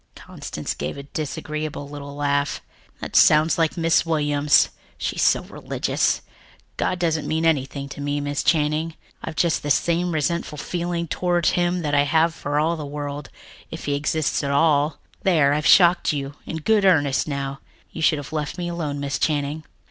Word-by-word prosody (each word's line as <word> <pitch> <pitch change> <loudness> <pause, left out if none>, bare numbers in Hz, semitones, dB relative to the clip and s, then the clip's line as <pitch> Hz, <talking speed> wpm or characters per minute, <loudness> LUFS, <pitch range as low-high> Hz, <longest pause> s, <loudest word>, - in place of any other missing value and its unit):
Constance - - -6
gave 75 - -5
a 140 - -7
disagreeable 150 +1 -5
little 145 0 -8
laugh. 140 0 0 0.4
"That - - -6
sounds 155 +2 +5
like 165 +2 +1
Miss 165 -1 +3
Williams 145 -2 +3 0.3
she - - -3
is - - 0
so - - +3
religious. - - -1 0.5
God 180 - -1
doesn't 165 -3 0
mean 160 +1 0
anything 140 -3 0
to 145 - -8
me, 145 0 -1
Miss 145 0 -2
Channing. 155 0 +1 0.3
I've 160 - -5
just 170 -1 +1
the 145 - -4
same 175 +4 +1
resentful 155 0 -1
feeling 170 +1 -3
toward 175 0 0
him 175 0 +1
that 145 -1 -2
I 145 0 +4
have 160 +3 +2
for 145 -2 -2
all 165 +2 +1
the 155 - -6
world, 145 -1 -5 0.4
if - - -7
he 145 - 0
exists 150 +1 0
at 140 - -1
all. 150 +1 +2 0.2
There, 155 -7 +3
I've 150 -1 0
shocked 175 -1 +6
you 140 -1 -4
in 160 - -4
good 210 +6 +2
earnest 145 -8 +3
now. 140 -1 -3 0.3
You 165 - -7
should 155 -1 +3
have 145 +1 -8
left 155 +2 -3
me 175 -1 -3
alone, 155 -5 -3
Miss 140 -4 -2
Channing." 150 0 -1
150 Hz, 180 wpm, -23 LUFS, 145-165 Hz, 0.5 s, shocked